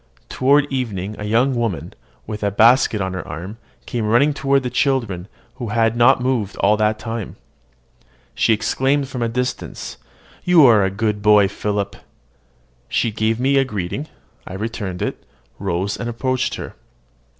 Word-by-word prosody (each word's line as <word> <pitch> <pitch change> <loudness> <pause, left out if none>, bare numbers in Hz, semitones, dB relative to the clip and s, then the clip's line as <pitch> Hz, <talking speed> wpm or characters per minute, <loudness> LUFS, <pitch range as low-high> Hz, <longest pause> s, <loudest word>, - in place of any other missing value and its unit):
Toward 140 +3 +3
evening 105 -6 -3
a 105 - -4
young 120 +6 +2
woman, 115 -7 -2 0.3
with 105 -1 -6
a 100 - +1
basket 110 +1 +4
on 95 0 -2
her 95 - -6
arm, 95 +7 -7 0.3
came 115 -3 -2
running 130 +7 +3
toward 140 -1 +1
the 125 - -3
children, 115 -10 0 0.3
who 120 -3 -5
had 115 +1 +1
not 120 +2 +5
moved 120 -6 -1
all 105 +2 +3
that 110 0 +1
time. 115 -2 -5 1.0
She - - +2
exclaimed 135 +6 +1
from 125 - -5
a 115 - 0
distance, 125 +2 -4 0.5
"You 175 -5 +6
are 110 -5 +6
a 95 - +1
good 105 +1 -2
boy, 105 -1 +5
Philip!" 100 0 -3 0.9
She 115 - 0
gave 110 +2 0
me 135 +1 +3
greeting: 110 - -4 0.4
I 95 - -7
returned 100 -3 -4
it, - - -4 0.4
rose, 95 +1 -2
and 115 - -4
approached 130 +2 -1
her. - - -7
115 Hz, 155 wpm, -20 LUFS, 105-130 Hz, 1.0 s, You